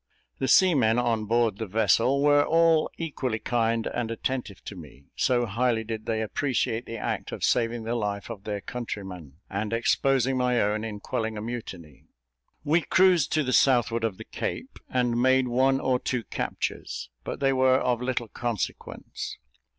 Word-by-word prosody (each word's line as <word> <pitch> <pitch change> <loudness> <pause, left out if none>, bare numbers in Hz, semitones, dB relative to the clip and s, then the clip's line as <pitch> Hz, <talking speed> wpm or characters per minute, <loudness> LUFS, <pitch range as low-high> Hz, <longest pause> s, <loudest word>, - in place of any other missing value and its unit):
The 130 - 0
seamen 130 -11 +4
on 115 -3 0
board 115 -2 +1
the 110 - -3
vessel 115 +7 +2
were 145 0 +5
all 165 0 +3
equally 135 -8 -2
kind 115 -1 0
and 120 -2 -2
attentive 115 -2 -4
to 100 - -7
me, 70 -5 -13
so 120 -1 +2
highly 115 +1 0
did 110 -1 -6
they 110 -1 0
appreciate 120 0 -1
the 115 - -5
act - - -3
of - - -6
saving 115 -1 +1
the 115 +1 -2
life 105 -1 -3
of 100 -4 -8
their 105 -1 -4
countryman, 95 - -6
and 105 +2 -3
exposing 130 +2 +2
my 125 -1 +2
own 105 +1 0
in 105 -2 -6
quelling 110 +1 -3
a - - -4
mutiny. 95 - -7 0.6
We 160 +3 +3
cruised 180 -3 +3
to 155 - +2
the 130 -1 -1
southward 120 -3 +3
of 110 -5 -1
the - - -9
Cape, - - -5
and 120 -2 +1
made 130 0 +4
one 130 +2 +2
or 130 -2 +1
two 125 -2 -2
captures; 65 - -4
but - - -5
they 135 -1 +2
were 130 0 +4
of 125 -2 0
little 125 -2 -2
consequence. 115 -2 -5
120 Hz, 170 wpm, -26 LUFS, 110-130 Hz, 0.6 s, were